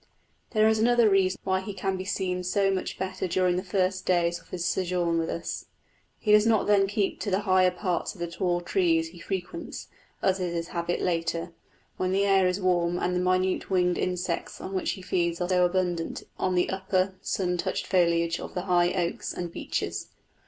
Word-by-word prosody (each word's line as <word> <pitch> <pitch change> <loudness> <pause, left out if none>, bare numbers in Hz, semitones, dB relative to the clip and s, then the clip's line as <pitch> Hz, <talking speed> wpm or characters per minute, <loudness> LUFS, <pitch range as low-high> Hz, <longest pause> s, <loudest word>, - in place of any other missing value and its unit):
There 215 -1 +3
is 220 0 +3
another 240 0 +4
reason 190 -1 +2
why 190 0 +1
he 195 +1 -6
can 195 -1 -1
be 185 0 -5
seen 180 -2 -2
so 195 +2 +2
much 190 -1 -3
better 190 0 -3
during 180 0 +2
the 180 - 0
first 185 -1 0
days 175 -1 +1
of - - -22
his 175 -2 -3
sojourn 175 -2 0
with 165 - -1
us: 170 - -4 0.5
he 215 - 0
does 210 +1 +6
not 220 -3 +3
then 200 -1 +4
keep 200 0 -1
to 205 - -2
the 190 +1 +1
higher 185 -2 +4
parts 180 0 -2
of - - -15
the 175 - -1
tall 175 +1 -1
trees 165 -2 +1
he 175 +1 -14
frequents, 190 - -5 0.3
as 190 0 +1
his 170 -2 -2
habit 170 0 -2
is - - 0
later, 170 -1 -1 0.5
when 185 0 0
the 195 +1 +2
air 195 -2 +4
is 180 +2 0
warm 175 -2 +1
and 180 0 0
the - - +1
minute 185 +1 +1
winged 180 -2 +2
insects 180 -1 -2
on 190 - -6
which 185 - 0
he 190 - -9
feeds 170 -2 0
are 180 0 +2
abundant 175 -2 -1 0.2
on 185 -1 +1
the 180 - +2
upper 190 0 0
sun 180 -3 -1
touched - - -2
foliage 170 -2 +2
of - - -8
the 180 - -1
high 175 -2 +3
oaks 175 -2 -2
and 175 -1 -5
beeches. - - -3
185 Hz, 200 wpm, -27 LUFS, 175-190 Hz, 0.5 s, does